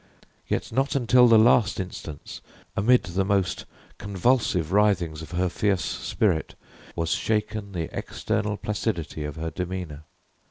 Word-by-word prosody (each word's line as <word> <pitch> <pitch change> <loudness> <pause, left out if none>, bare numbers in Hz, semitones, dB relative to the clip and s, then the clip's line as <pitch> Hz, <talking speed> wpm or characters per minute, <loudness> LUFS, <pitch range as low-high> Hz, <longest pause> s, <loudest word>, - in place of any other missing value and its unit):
Yet - - -2
not 135 +2 0
until 125 -1 +5
the 115 -1 +7
last 110 -2 +4
instance, 85 -5 -7 0.3
amid 125 +5 +4
the 90 +2 -1
most 95 -1 0 0.3
convulsive 100 - +1
writhings 95 -6 +2
of 80 - -9
her 90 +1 +1
fierce 90 -1 0
spirit, 90 -2 -1 0.4
was 85 0 -1
shaken 105 -2 -1
the 85 -3 -4
external 105 0 -2
placidity 100 -8 -3
of 75 -1 -5
her 80 0 -4
demeanor. 90 -3 -5
95 Hz, 130 wpm, -25 LUFS, 85-105 Hz, 0.4 s, the